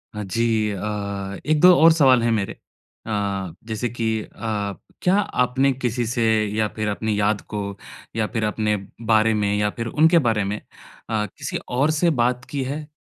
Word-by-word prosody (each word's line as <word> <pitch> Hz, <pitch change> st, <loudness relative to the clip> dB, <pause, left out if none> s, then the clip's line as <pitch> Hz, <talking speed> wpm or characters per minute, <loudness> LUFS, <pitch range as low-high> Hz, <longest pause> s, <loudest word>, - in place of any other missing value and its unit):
हाँ 105 Hz, -, -4 dB
जी। 110 Hz, +1 st, 0 dB
अ, 100 Hz, -, -5 dB, 0.7 s
1-2 155 Hz, +4 st, +6 dB
और 165 Hz, -, +9 dB
सवाल 135 Hz, -6 st, +5 dB
हैं 115 Hz, -, +2 dB
मेरे 105 Hz, -3 st, -1 dB, 0.5 s
अ, 100 Hz, -4 st, -2 dB
जैसे 115 Hz, +2 st, -2 dB
कि 110 Hz, -2 st, -1 dB
अ, 105 Hz, -2 st, -4 dB, 0.3 s
क्या 185 Hz, +1 st, +3 dB
आपने 135 Hz, -8 st, +1 dB
किसी 125 Hz, -2 st, -2 dB
से 120 Hz, 0 st, -1 dB, 0.3 s
या 110 Hz, 0 st, +1 dB
फिर 110 Hz, -1 st, -2 dB
अपनी 105 Hz, 0 st, -1 dB
याद 105 Hz, 0 st, +1 dB
को 105 Hz, -, -1 dB, 0.6 s
या 110 Hz, -1 st, 0 dB
फिर 110 Hz, -, -1 dB
अपने 105 Hz, 0 st, 0 dB, 0.3 s
बारे 110 Hz, 0 st, +4 dB
में 105 Hz, -1 st, 0 dB
या 105 Hz, 0 st, +1 dB
फिर 115 Hz, -1 st, -3 dB
उनके 160 Hz, +6 st, +4 dB
बारे 110 Hz, -3 st, +2 dB
में 100 Hz, +2 st, -3 dB, 0.5 s
अ, 110 Hz, -2 st, 0 dB
किसी -, -, -4 dB
और 135 Hz, +5 st, +2 dB
से 160 Hz, +3 st, +2 dB
बात 125 Hz, +1 st, 0 dB
की 140 Hz, -2 st, -1 dB
है? 145 Hz, +3 st, -5 dB
115 Hz, 175 wpm, -22 LUFS, 105-130 Hz, 0.7 s, और